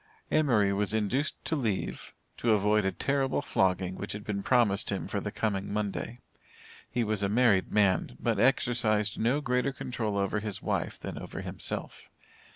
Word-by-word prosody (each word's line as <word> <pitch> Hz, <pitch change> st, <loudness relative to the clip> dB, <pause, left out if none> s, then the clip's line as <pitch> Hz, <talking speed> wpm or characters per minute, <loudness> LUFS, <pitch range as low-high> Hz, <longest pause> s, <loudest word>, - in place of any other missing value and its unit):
Emory 115 Hz, -10 st, +3 dB
was 105 Hz, +2 st, +1 dB
induced 115 Hz, +8 st, 0 dB
to 160 Hz, -, +1 dB
leave, 110 Hz, -9 st, -3 dB, 0.2 s
to 115 Hz, -2 st, +2 dB
avoid 105 Hz, 0 st, +3 dB
a 95 Hz, -, +2 dB
terrible 140 Hz, +2 st, 0 dB
flogging, 95 Hz, -1 st, +1 dB
which 100 Hz, +2 st, -5 dB
had 105 Hz, 0 st, -6 dB
been 100 Hz, -1 st, -3 dB
promised 115 Hz, -4 st, +2 dB
him -, -, -3 dB
for -, -, -2 dB
the -, -, -4 dB
coming 100 Hz, -3 st, -2 dB
Monday. 105 Hz, +2 st, -2 dB, 0.7 s
He 120 Hz, -, 0 dB
was 110 Hz, -2 st, -1 dB
a 100 Hz, -, +1 dB
married 110 Hz, -3 st, +3 dB
man, 95 Hz, -11 st, +2 dB
but 115 Hz, -4 st, 0 dB
exercised 115 Hz, -5 st, +2 dB
no 125 Hz, +6 st, +2 dB
greater 125 Hz, 0 st, +1 dB
control 115 Hz, -6 st, -3 dB
over 100 Hz, +1 st, 0 dB
his 105 Hz, -2 st, -3 dB
wife -, -, -2 dB
than -, -, -6 dB
over -, -, -7 dB
himself. -, -, -4 dB
105 Hz, 165 wpm, -29 LUFS, 100-120 Hz, 0.7 s, Emory